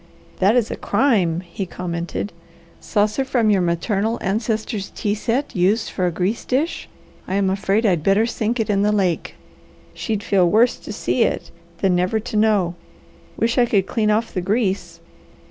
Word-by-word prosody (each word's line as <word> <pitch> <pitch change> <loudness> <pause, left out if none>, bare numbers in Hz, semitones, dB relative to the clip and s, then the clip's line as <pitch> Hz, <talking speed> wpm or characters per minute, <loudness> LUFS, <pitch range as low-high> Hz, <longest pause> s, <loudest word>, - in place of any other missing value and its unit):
"That 200 +5 +4
is 240 -3 +2
a - - -2
crime!" 200 -8 +1
he 185 +2 -6
commented. 175 +3 -4 0.5
"Saucer 215 +5 0
from 240 -5 +2
your 195 -2 +3
maternal 195 +6 0
ancestors' 215 0 -2
tea 205 - -1
set 240 +6 -2
used 195 +5 +1
for 185 -2 0
a - - 0
grease 185 +7 -1
dish. 285 +6 -1 0.4
I 190 - -2
am 195 -1 +2
afraid 195 +3 +1
I'd 180 -6 +2
better 195 +6 +3
sink 230 +1 -2
it 225 - 0
in 200 -1 +1
the 210 +1 +3
lake. 190 -5 0 0.6
She'd 215 -3 -3
feel 185 -3 +3
worse 225 +6 +4
to - - -8
see - - -1
it - - 0 0.3
than 190 -2 +3
never 180 +5 +1
to 220 0 -7
know. 210 -5 +2 0.6
Wish 235 +2 +1
I 240 - +4
could 200 -4 +2
clean 215 +1 0
off 220 +2 0
the 185 - -1
grease! 200 +1 -1
205 Hz, 175 wpm, -21 LUFS, 185-225 Hz, 0.6 s, That